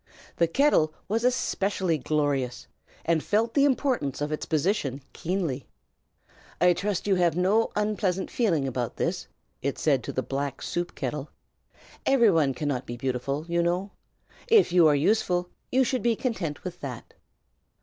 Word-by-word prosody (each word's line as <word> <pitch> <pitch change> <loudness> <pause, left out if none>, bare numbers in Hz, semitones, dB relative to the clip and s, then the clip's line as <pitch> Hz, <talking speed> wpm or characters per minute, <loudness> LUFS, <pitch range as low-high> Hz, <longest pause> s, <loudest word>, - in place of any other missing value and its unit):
The 170 - +3
kettle 165 - +3
was 225 +3 0
especially 195 -8 0
glorious, 140 -3 -1 0.4
and 165 -1 +2
felt 225 +3 +1
the 280 -1 +4
importance 255 - 0
of 145 +1 -2
its 155 - -3
position 150 - 0
keenly. 165 -7 -2 0.9
"I 180 0 +5
trust 195 +2 -2
you 200 - +3
have 175 -2 +2
no 200 +5 +3
unpleasant 205 -3 -1
feeling 170 - +1
about 125 -2 -3
this," - - -2 0.3
it 140 +1 -2
said 140 -6 +2
to - - -3
the 130 - -2
black 140 0 -3
soup 175 0 -3
kettle. 140 +2 -4 0.7
"Every 235 -6 +5
one 150 -6 +2
cannot 140 -3 -2
be 120 - -5
beautiful, 135 +4 -2
you 170 0 +1
know. 180 +3 -1 0.6
If 435 - +5
you 175 -2 +6
are 150 - +4
useful, 180 +2 +1 0.2
you 260 +1 +4
should 255 0 -1
be 235 -1 +2
content 200 - -3
with 180 -1 -6
that." 130 -5 -7
170 Hz, 155 wpm, -27 LUFS, 140-205 Hz, 0.9 s, you